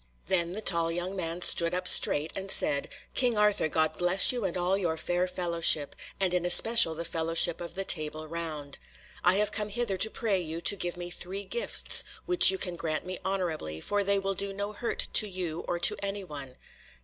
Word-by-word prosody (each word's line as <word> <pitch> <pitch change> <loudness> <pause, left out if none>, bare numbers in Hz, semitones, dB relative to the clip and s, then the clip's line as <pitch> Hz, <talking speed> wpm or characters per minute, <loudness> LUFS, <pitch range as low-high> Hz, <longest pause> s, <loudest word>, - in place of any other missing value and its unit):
Then 175 -2 -1
the 215 - -1
tall 165 -3 +1
young 175 +3 -5
man 170 -1 -5
stood 170 +1 +3
up 180 0 -1
straight, 150 -2 +5
and 195 0 -5
said: 140 -6 +3 0.2
"King 245 -4 +2
Arthur, 210 -6 +1
God 155 0 -1
bless 180 +2 +5
you 245 -5 -4
and 185 -1 -4
all 180 +2 -1
your 175 -5 -3
fair 175 +3 -2
fellowship, 170 -5 0 0.2
and 190 -2 0
in 180 -1 -1
especial 175 0 +6
the 170 +1 -7
fellowship 165 +1 0
of 170 0 -7
the 195 0 -2
Table 155 -2 -2
Round. 155 -3 -7 0.4
I 180 +1 +4
have 210 +1 -1
come 210 0 -4
hither 215 -2 -4
to 220 +4 0
pray 215 -4 -2
you 165 -1 -6
to 200 - -1
give 175 -2 -5
me 175 0 -8
three 190 +3 -4
gifts, 475 - +2 0.2
which 360 - +6
you 190 - 0
can 180 -2 -5
grant 155 -1 -5
me 185 0 -7
honourably, 170 - -4
for 205 - -2
they 200 0 0
will 195 0 -3
do 200 +1 -4
no 200 +1 -6
hurt 230 +3 -4
to 215 - +4
you 180 -4 -5
or 175 - -3
to 170 - +3
any 200 0 -5
one." 140 -7 -9
180 Hz, 210 wpm, -27 LUFS, 165-195 Hz, 0.4 s, especial